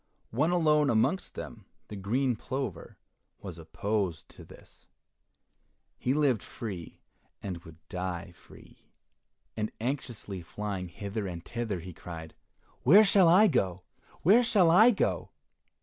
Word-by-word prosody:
One 145 +9 +1
alone 155 -4 +3
amongst 120 - +1
them, - - -8 0.2
the 105 - -8
green 120 +6 0
plover, 125 -5 -5 0.4
was 90 -4 -8
opposed 95 +1 -2
to - - -13
this. - - -17 1.1
He - - -3
had 135 - +3
lived 135 -8 +2
free, 100 -9 -7 0.4
and 90 -4 -4
would 80 -1 -13
die 90 -1 -4
free, 85 - -18 0.7
and 110 -1 -2
anxiously 120 -6 -4
flying 95 +2 -5
hither 100 +4 -5
and 85 -2 -7
thither, 115 -6 -3
he 90 +1 -9
cried, 80 -1 -9 0.5
"Where 195 - +8
shall 195 -3 +5
I 190 +6 +7
go? 95 - +1 0.4
where 210 +9 +6
shall 200 -8 +4
I 220 +8 +8
go?" 225 - 0
110 Hz, 135 wpm, -29 LUFS, 90-150 Hz, 1.1 s, Where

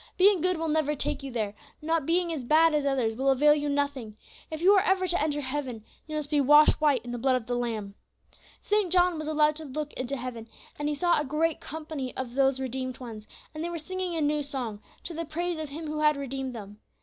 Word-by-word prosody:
Being 385 -2 +5
good 365 0 +1
will 325 0 -2
never 300 -1 +1
take 290 +1 -1
you 275 - -6
there, 215 -4 -2 0.3
not 320 -2 -1
being 340 0 +1
as 290 -5 -4
bad 315 +5 +4
as 295 -2 +1
others 250 -5 0
will 265 +3 +1
avail 295 +3 +5
you 295 -1 -1
nothing; 280 -7 -2 0.3
if 315 - -5
you 375 +4 +6
are 390 - +5
ever 375 -1 +2
to 350 -2 +1
enter 295 -1 0
heaven, 260 -5 -4 0.2
you 310 - -5
must 300 -1 -3
be 295 -1 +3
washed 295 +3 +6
white 280 -6 +2
in 240 - -5
the 245 - -4
blood 260 +1 +2
of 250 -3 -2
the 245 - -3
Lamb. 225 -5 -3 0.7
"St. 415 -4 +1
John 355 -2 +3
was 310 - -5
allowed 305 -1 +3
to 320 - -7
look 295 +2 -5
into 260 +2 -3
heaven, 240 -3 -6 0.3
and 295 0 -1
he 300 - -1
saw 345 +2 +2
a - - 0
great 305 +3 0
company 305 -4 -6
of 255 -2 -4
these 270 0 +2
redeemed 260 0 -4
ones, 225 -4 -9 0.3
and 310 +1 -5
they 340 - -2
were 345 - -4
singing 365 +2 -4
a 320 - 0
new 300 0 +1
song, 250 -7 -4 0.2
to 340 - -6
the 330 +1 -3
praise 335 +2 -3
of 310 -2 -5
Him 315 +3 -7
who 305 0 -3
had 300 -1 +3
redeemed 270 -2 -4
them. 205 -1 -9
295 Hz, 245 wpm, -28 LUFS, 260-320 Hz, 0.7 s, you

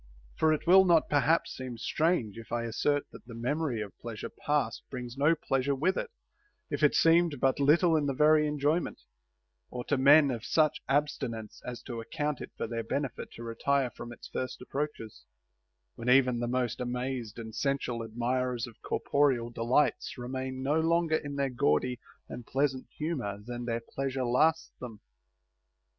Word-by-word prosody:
For 160 - +3
it 155 - -1
will 190 +2 +8
not 170 -4 +3
perhaps 150 +3 +2
seem 130 -2 -6
strange 140 - 0
if 115 0 -11
I 120 0 -1
assert, 145 +5 0
that - - -12
the 115 - -9
memory 125 0 -1
of 100 -3 -11
pleasure 115 -2 -6
past 145 -6 -1
brings 125 -2 -6
no 145 +4 +3
pleasure 135 -2 0
with 175 +8 +1
it - - -3 0.6
if - - -2
it - - +4
seemed 165 -3 +4
but 135 +1 +2
little 160 +4 +4
in 150 -2 +1
the 135 - -1
very 150 +1 +5
enjoyment, 150 +3 0 0.7
or 125 -1 -5
to 145 - 0
men 140 +1 +7
of 120 -2 -4
such 155 +2 +2
ab 145 +2 +4
stinence 115 -7 -6
as 125 -1 -7
to 115 -2 -5
account 150 +4 -3
it - - -6
for - - -2
their 115 0 -3
benefit 135 +2 -3
to 115 - -9
retire 125 +3 0
from 120 +2 -9
its 120 - -10
first 130 0 -4
approaches; 135 -4 -5 0.7
when 115 +2 -4
even 125 -2 +4
the 120 - -1
most 125 -1 -1
amazed 125 -2 -3
and 110 -1 -7
sensual 130 -1 -1
admirers 120 +2 -1
of 120 -3 -14
corporeal 130 -5 +1
delights 120 +6 +1
remain 130 +1 -4
no 145 +4 +2
longer 165 0 +2
in 145 -2 -6
their 140 -1 0
gaudy 120 +3 +1 0.3
and 120 - -8
pleasant 135 -1 0
humor 135 -11 -3
than 120 0 -5
their 115 -1 -2
pleasure 135 -1 -2
lasts 155 +7 +2
them. 115 -4 -8
130 Hz, 175 wpm, -30 LUFS, 120-150 Hz, 0.7 s, will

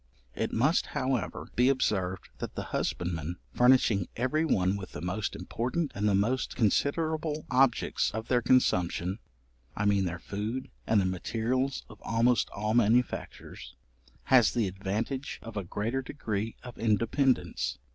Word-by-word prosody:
It - - -2
must, 135 +9 +2
however, 130 -7 -2
be 125 +2 +4
observed 95 -8 0
that - - -5
the - - -3
husbandman, 85 -1 -2 0.2
furnishing 125 -7 +4
every 130 +6 +1
one 95 - +2
with 95 -3 -7
the - - -5
most 90 +4 -2
important 140 +6 -2
and 105 +1 +1
the 100 - +3
most 115 +7 0
considerable 155 - 0
objects 130 0 +3
of 110 +1 -5
their 125 -1 +2
consumption 95 -6 +2 0.6
(I 105 - 0
mean 100 -2 +3
their 90 -1 -3
food, 105 +8 -4 0.2
and 110 - +4
the 95 - +2
materials 115 +8 -1
of 110 -2 -14
almost 115 +2 +2
all 105 +2 -2
manufactures) 120 +1 0 0.5
has 125 -5 +5
the 115 -4 +1
advantage 105 +8 -3
of 115 0 -9
a 100 - -2
greater 110 +8 -2
degree 110 -5 -4
of 125 -2 -10
independence. 115 - +1
115 Hz, 145 wpm, -29 LUFS, 100-130 Hz, 0.6 s, has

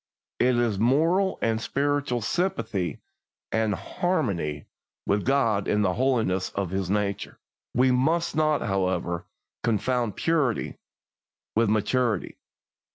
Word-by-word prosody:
It 125 0 +3
is 115 -5 +1
moral 165 - +3
and 110 0 +1
spiritual 140 -2 0
sympathy 110 - -1 0.5
and 110 -2 +1
harmony 100 - -2 0.4
with 100 0 +1
God 115 -7 +2
in 105 0 +2
the 95 -2 +2
holiness 115 -8 +1
of 95 -3 -2
His 95 -1 -2
nature. 100 -1 -1 0.4
We 130 +1 +4
must 160 +7 +1
not, 155 -1 +2
however, 90 -3 -1 0.4
confound 115 -1 0
purity 150 -7 0 0.8
with 115 -1 +3
maturity. 110 0 0
115 Hz, 110 wpm, -26 LUFS, 100-135 Hz, 0.8 s, We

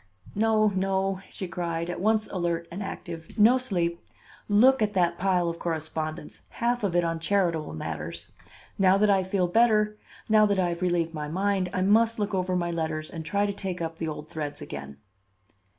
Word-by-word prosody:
"No, 215 0 +3
no," 195 0 0
she 190 - -6
cried, 170 -1 -3
at 175 - -4
once 215 +1 +2
alert 170 -2 -1
and 185 +4 -5
active; 170 -4 -7
"no 230 +5 +6
sleep. 175 -8 -1 0.5
Look 245 +5 +5
at 210 -1 +1
that 175 -2 +2
pile 180 -2 +2
of 170 0 -3
correspondence, 155 -2 -4
half 240 0 -1
of 190 -4 0
it 175 - +4
on 165 -1 -1
charitable 165 - 0
matters. - - -5 0.5
Now 190 0 +5
that 210 0 +4
I 190 -1 +3
feel 185 -1 0
better, 210 +1 +3 0.3
now 215 -1 +5
that 200 -1 +1
I 180 -2 +2
have 170 +1 -4
relieved 175 -2 0
my 150 -1 -4
mind, 190 +3 0
I 185 - -1
must 225 +4 +4
look 205 -1 -2
over 185 -1 0
my 175 -1 0
letters 160 -2 -3
and 165 -2 -6
try 200 +6 0
to 200 - -1
take 190 -2 -5
up 165 -1 -4
the 165 - -3
old 150 -1 -6
threads 150 -2 -5
again." 70 0 -8
185 Hz, 190 wpm, -27 LUFS, 165-205 Hz, 0.5 s, no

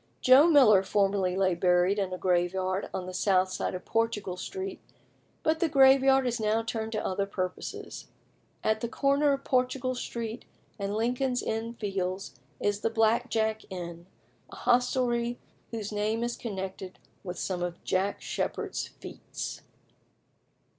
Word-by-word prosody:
Joe 265 +5 +7
Miller 245 - +7
formerly 195 -1 +1
lay 190 -1 +2
buried 180 +3 +3
in 190 -2 -1
a 185 - -3
graveyard 185 +1 0
on 185 - -4
the 185 - -7
south 185 -1 +2
side 185 - -2
of 180 - -7
Portugal 225 -5 -1
Street, 380 - -6 0.6
but 315 0 +2
the 335 - +2
graveyard 270 -1 +6
is 240 -1 -1
now 220 +1 +1
turned 225 -1 -3
to 215 - -2
other 195 +1 -1
purposes. 185 -2 -5 0.6
At 220 0 +1
the 235 - -1
corner 280 +3 +2
of 275 0 -1
Portugal 255 0 0
Street 235 -2 -5 0.4
and 200 +1 -2
Lincoln's 245 +3 0
Inn 225 +1 -3
Fields 190 -6 -3 0.3
is 205 0 0
the 225 - 0
"Black 225 +2 +2
Jack" 220 -1 0
Inn, 175 -2 -7 0.4
a - - -11
hostelry 245 -1 +1 0.3
whose 220 -3 -5
name 215 +2 -1
is 240 0 -2
connected 190 -3 -6 0.3
with 180 -2 -6
some 180 -1 -2
of 175 -1 -4
Jack 195 +2 -1
Sheppard's - - -3
feats. - - -8
215 Hz, 145 wpm, -28 LUFS, 190-245 Hz, 0.6 s, Joe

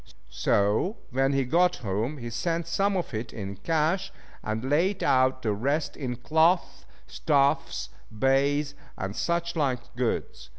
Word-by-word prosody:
So 105 - +1
when 135 +2 +2
he 135 -1 +1
got 175 +7 +3
home 110 +7 -2
he 120 -2 -6
sent 165 +8 -1
some 195 +4 +1
of 175 - -3
it 110 +2 -4
in 100 -2 -6
cash, 165 - 0 0.3
and 110 +4 -3
laid 175 +8 +1
out 130 0 +3
the 110 -2 +1
rest 140 +9 -1
in 125 -4 -4
cloth, 160 +8 +1 0.2
stuffs, 140 - +1 0.2
baize, 140 +5 +1 0.2
and 95 +2 -4
such 170 0 -1
like 130 -6 -1
goods. 115 - -2
135 Hz, 140 wpm, -27 LUFS, 115-165 Hz, 0.3 s, got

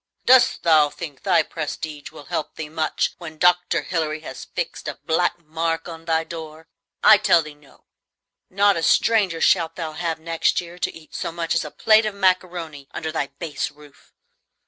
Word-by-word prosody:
Dost 255 -1 +5
thou 155 -3 +5
think 145 -3 -8
thy 175 -5 +3
prestige 155 -2 -6
will 150 -2 -13
help 155 - -4
thee 155 -1 -6
much 155 0 -1
when 160 -3 -9
Dr. 180 +1 +3
Hilary 155 -3 -2
has 130 -4 -8
fixed - - -5
a - - -4
black 175 +2 +1
mark 165 0 -3
on 165 -1 -9
thy 160 0 +1
door! 160 -1 -9 0.4
I 215 - +9
tell 170 -5 +4
thee 155 0 -10
no; 145 -1 -23 0.6
not 200 +1 +3
a 165 - -2
stranger 195 -2 +3
shalt 165 -3 +3
thou 165 -3 -4
have 165 0 -3
next 165 0 0
year 175 0 -9
to - - -1
eat 160 -1 -15
so - - -3
much 165 0 -2
as 165 - +1
a 150 - -6
plate 215 +6 +4
of 210 - -4
macaroni 180 -6 -1
under 160 -1 -4
thy 150 -3 -2
base 160 -2 -3
roof! 145 -1 -19
165 Hz, 185 wpm, -22 LUFS, 155-175 Hz, 0.6 s, I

